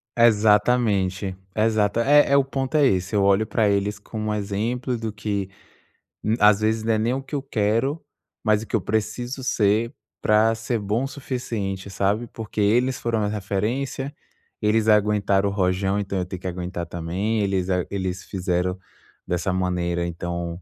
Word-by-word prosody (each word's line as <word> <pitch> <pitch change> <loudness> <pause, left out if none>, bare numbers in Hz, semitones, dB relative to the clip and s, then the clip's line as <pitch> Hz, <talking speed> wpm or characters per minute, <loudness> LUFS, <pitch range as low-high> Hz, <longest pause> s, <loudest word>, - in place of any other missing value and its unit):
Exatamente. 105 -4 +3 0.2
Exata 110 0 +2
é 145 +1 +5
é 140 - +6
o 140 - +5
ponto 135 +1 -3
é 145 -2 +5
esse, 95 -2 +1
eu 100 - +3
olho 100 +2 +4
para 110 0 +1
eles 100 +1 0
como 110 0 -4
exemplos 115 +4 -2
do 110 -1 -3
que 100 -2 -3 0.7
m 110 +2 +1
às 105 0 +6
vezes 110 0 +1
não 115 0 +2
é - - +2
nem 115 +3 +1
o 135 - -2
que 140 +2 -6
eu 140 - -1
quero, 130 +4 0 0.4
mas 110 -1 +3
o - - -12
que - - -1
eu 105 - +1
preciso 120 +6 -2
ser 110 -1 +1 0.3
para 110 +1 +4
ser 115 +1 -2
bom 105 +5 -1
o - - -1
suficiente, 115 -9 -4
sabe, 100 +4 0
porque 110 -1 -4
eles 125 +5 +2
foram 115 -2 -1
uma 105 - 0
referência. 110 +8 -2 0.5
Eles 110 +1 +2
aguentaram 100 -2 +3
o - - -4
rojão, 95 0 +1
então 95 -1 -2
eu 90 - -1
tenho 90 0 -7
que 95 - -6
aguentar 90 -1 -4
também. 90 +7 -2
Eles 95 -2 0
a 90 -1 +1
eles 95 -2 -3
fizeram 90 -1 -1 0.5
dessa 90 +2 -1
maneira, 90 -2 -1
então, 85 0 -4
105 Hz, 175 wpm, -23 LUFS, 95-115 Hz, 0.7 s, é